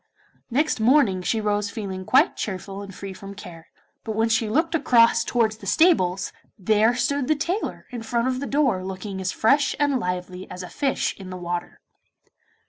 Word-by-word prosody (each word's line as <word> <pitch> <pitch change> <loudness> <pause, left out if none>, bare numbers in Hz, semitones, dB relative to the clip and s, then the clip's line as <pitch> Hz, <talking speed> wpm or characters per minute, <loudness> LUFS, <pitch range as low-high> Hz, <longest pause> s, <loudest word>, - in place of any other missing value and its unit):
Next 285 +2 +1
morning 220 -5 +4
she 210 +5 0
rose 205 -1 0
feeling 195 -4 -5
quite - - +4
cheerful 195 0 -5
and 200 -1 -8
free 195 0 -8
from 195 +1 -10
care, 170 -4 -11 0.4
but 220 -2 -4
when 225 +1 +2
she 225 -1 +1
looked 320 +8 +1
across 235 -7 +4
towards 220 -3 +1
the - - -11
stables, 195 - +3 0.2
there 215 +4 +3
stood 260 +2 0
the 310 - +3
tailor 350 +8 -3
in 240 -2 -5
front 235 +2 -1
of 255 0 -1
the 280 - -4
door 265 -10 +1
looking 190 +1 -5
as 185 0 -1
fresh 275 +6 +2
and 285 -3 +2
lively 180 -1 -4
as 180 0 -7
a 180 - -8
fish 270 +9 -1
in 190 -1 -9
the 185 - -6
water. 175 0 -5
220 Hz, 185 wpm, -24 LUFS, 190-255 Hz, 0.4 s, morning